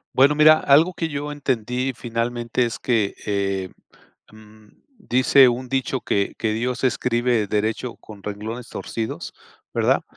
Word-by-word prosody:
Bueno, 135 +3 +5
mira, 155 +1 +6
algo 160 +6 +4
que 165 - -3
yo 145 0 -4
entendí 130 -2 -1
finalmente 120 +1 -2
es 115 - -4
que, 110 -5 0
em, 100 -2 -3 1.0
dice 130 - +5
un 125 +1 -3
dicho 130 0 -1
que 100 -3 -1
que 110 -1 -1
Dios 120 +3 -2
escribe 120 -3 +1
derecho 110 +4 -2
con 105 -3 -14
renglones 110 +4 -6
torcidos, 110 -1 -5 0.4
¿verdad? - - +2
120 Hz, 130 wpm, -22 LUFS, 110-135 Hz, 1.0 s, mira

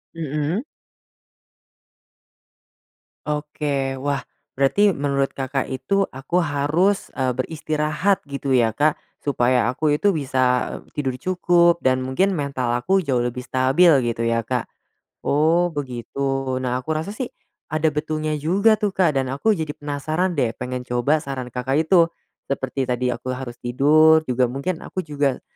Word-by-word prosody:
Mmm. 155 - -2 2.7
Oke, 145 -3 -2
wah, 140 0 -1 0.3
berarti 190 +9 +3
menurut 140 -1 -1
Kakak 135 0 -2
itu 135 +10 0
aku 135 +7 -2
harus 160 +5 +1
e 130 -2 -1
beristirahat, 155 +6 -1
gitu 140 -2 -2
ya 115 -2 +3
Kak. 150 +6 +2 0.2
Supaya 125 -3 +2
aku 150 +5 0
itu 200 -3 +2
bisa 130 -3 0 0.2
tidur 130 -3 -2
cukup, 175 -2 +3
dan 130 0 +3
mungkin 130 +10 +1
mental 140 -7 -2
aku 190 +8 +1
jauh 130 -5 +1
lebih 125 +1 -2
stabil 135 +8 +4 0.2
gitu 115 0 -2
ya 115 0 +1
Kak. 125 -2 -2 0.6
Oh 165 +4 +3
begitu. 135 0 -3
Nah 125 0 0
aku 155 +5 -3
rasa 160 +6 -3
sih, 245 +4 -4 0.4
ada 155 +1 +1
betulnya 155 +1 -2
juga 200 +8 +3
tuh 205 -3 -1
Kak 155 -7 +3
dan 130 - -1
aku 140 +12 +1
jadi 160 -7 -2
penasaran 155 +5 -2
deh 125 -8 0
pengen 125 0 -5
coba 125 +6 +1
saran 135 -4 -6
Kakak 125 +2 -2
itu. 170 0 +5 0.4
Seperti 135 -1 -2
tadi 125 0 0
aku 130 +2 -4
harus 125 -2 -7
tidur, 155 +6 +4
juga 125 -2 +1
mungkin 140 +7 -3
aku 185 - -5
juga 145 -3 -1
140 Hz, 140 wpm, -22 LUFS, 130-160 Hz, 2.7 s, itu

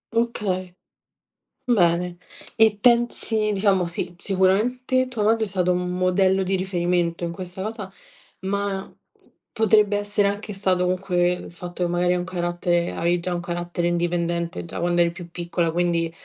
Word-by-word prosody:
Okay, 190 -6 -1 0.9
bene. 175 -5 +2 0.4
E 220 -2 +5
pensi, 235 -3 +2
diciamo 195 -3 +2
sì, 175 +1 -4
sicuramente 230 +8 +1
tua 245 -4 -4
madre 220 +1 +3
è - - -5
stato 180 -2 +1
un 180 0 -2
modello 185 +1 +2
di 190 +1 0
riferimento 175 -2 0
in 170 - -2
questa 180 +1 -7
cosa, 210 -2 -5 0.5
ma 195 0 -2
p - - -35 0.3
potrebbe 210 -1 +3
essere 205 0 +1
anche 205 +1 -3
stato 190 -2 +1
comunque 180 -1 +1
il 180 - -8
fatto 175 0 -5
che 175 - 0
magari 175 +1 +2
hai 180 - +1
un - - -2
carattere 175 -1 -1
avevi 175 +1 +1
già 180 +1 -3
un 175 - -2
carattere 175 0 -2
indipendente 170 - -1
già - - -6
quando 175 0 +2
eri 170 - +3
più 175 0 -10
piccola, 170 0 -1
quindi 170 -1 0
180 Hz, 160 wpm, -23 LUFS, 175-200 Hz, 0.9 s, E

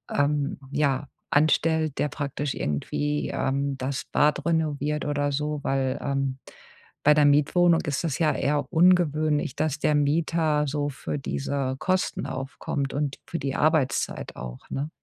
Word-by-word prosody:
ähm, 145 0 +1
ja, 140 -1 +1 0.2
anstellt, 155 0 +2
der - - +2
praktisch 140 0 -3
irgendwie, 145 - -2
ähm, 140 0 -1
das 130 +1 -3
Bad 150 0 +1
renoviert 150 -2 0
oder 145 -1 0
so. 150 +1 -2
Weil, 135 -1 0
ähm, 135 -1 -1 0.7
bei 150 - +7
der 150 0 +4
Mietwohnung 165 +4 +4
ist 145 +1 -1
das 155 -5 -2
ja 155 -3 +3
eher 145 +1 0
ungewöhnlich, 155 -5 +3
dass 155 0 -1
der 150 0 +2
Mieter 150 0 +1
so 145 +1 -1
für 145 +2 -4
diese 135 -1 -2
Kosten 185 -7 0
aufkommt 135 +1 -4
und 145 -1 -2
für 170 - -4
die 135 -1 -3
Arbeitszeit 155 -3 0
auch, 60 0 -7
ne? 145 +3 -3
145 Hz, 145 wpm, -26 LUFS, 140-155 Hz, 0.7 s, bei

